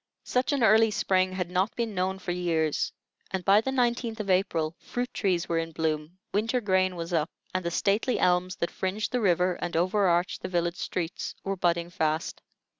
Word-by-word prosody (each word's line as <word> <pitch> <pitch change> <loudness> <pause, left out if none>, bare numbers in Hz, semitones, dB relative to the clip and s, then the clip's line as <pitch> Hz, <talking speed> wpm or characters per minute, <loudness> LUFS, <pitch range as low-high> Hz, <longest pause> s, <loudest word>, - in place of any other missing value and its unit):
Such 250 +3 0
an 280 -4 +1
early 220 +1 +6
spring 185 -2 +1
had 180 -2 -3
not 185 +4 0
been 230 -2 -2
known 190 0 -1
for 180 -2 -4
years; 165 -4 0 0.4
and 190 -2 -3
by 200 +2 +6
the 265 - -3
19th 240 -3 0
of 200 -2 -1
April 170 -4 +1
fruit 245 +1 -4
trees 185 -3 0
were 165 -1 +1
in 165 0 -4
bloom, 155 +2 -2 0.2
winter 225 +5 +1
grain 185 -4 +1
was 170 +1 -5
up, 160 0 +1 0.2
and 185 0 -1
the 170 - -1
stately 205 +8 +1
elms 180 +1 +2
that 170 - -2
fringed 195 +3 -2
the 250 - 0
river 180 -2 +2
and 175 -2 -2
overarched 180 -1 +2
the - - -4
village 170 -1 0
streets 175 -1 -3
were 195 0 -1
budding 175 -1 0
fast. 160 -2 -1
185 Hz, 190 wpm, -27 LUFS, 170-205 Hz, 0.4 s, early